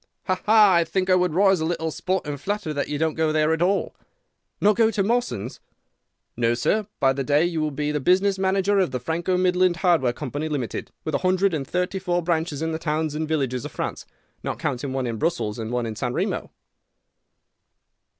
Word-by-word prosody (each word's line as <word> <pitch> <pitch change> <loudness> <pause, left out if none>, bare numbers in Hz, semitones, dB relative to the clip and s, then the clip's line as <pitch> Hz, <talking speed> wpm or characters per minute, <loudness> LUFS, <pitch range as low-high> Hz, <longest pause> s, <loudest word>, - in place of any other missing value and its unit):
"'Ha, 185 -1 -1
ha! 210 -3 +7
I 170 -1 +4
think 185 +3 -1
I - - +6
would 180 -3 +1
risk 190 -2 +4
a - - 0
little 160 -1 -2
sporting 170 -3 -2
flutter 200 +1 -3
that 145 - -2
you 150 - -2
don't 160 +1 0
go 160 -1 +1
there 155 +1 +2
at 165 - -2
all.' 195 +3 +1 0.7
"'Not 210 +1 +4
go 225 -1 +4
to 205 -3 0
Mawson's?' 235 - -1 0.8
"'No, 115 0 +1
sir. 205 - 0
By 135 -1 +3
that 135 0 -3
day 145 +4 +3
you 165 -2 -1
will 155 - 0
be 150 +1 -2
the 150 - -1
business 190 +6 +2
manager 195 +1 +2
of 185 - +2
the 125 - -3
Franco 170 +7 -1
Midland 180 -1 +3
Hardware 160 -9 +4
Company, 145 +4 -4
Limited, 135 -6 -3
with 155 - -4
a - - +1
hundred 185 +1 +2
and 140 -4 -2
thirty 180 +3 -1
four 175 -2 -1
branches 160 -3 -1
in 160 - -1
the 160 - -3
towns 155 -1 -1
and 155 +1 -2
villages 135 -6 -1
of - - -7
France, - - -4 0.3
not - - -3
counting 130 +2 -3
one 130 -1 -2
in 115 -2 -3
Brussels 155 -10 -1
and 110 -1 -4
one 120 -1 -1
in 110 -1 -4
San 125 +2 -2
Remo. - - -2
160 Hz, 210 wpm, -24 LUFS, 145-185 Hz, 0.8 s, ha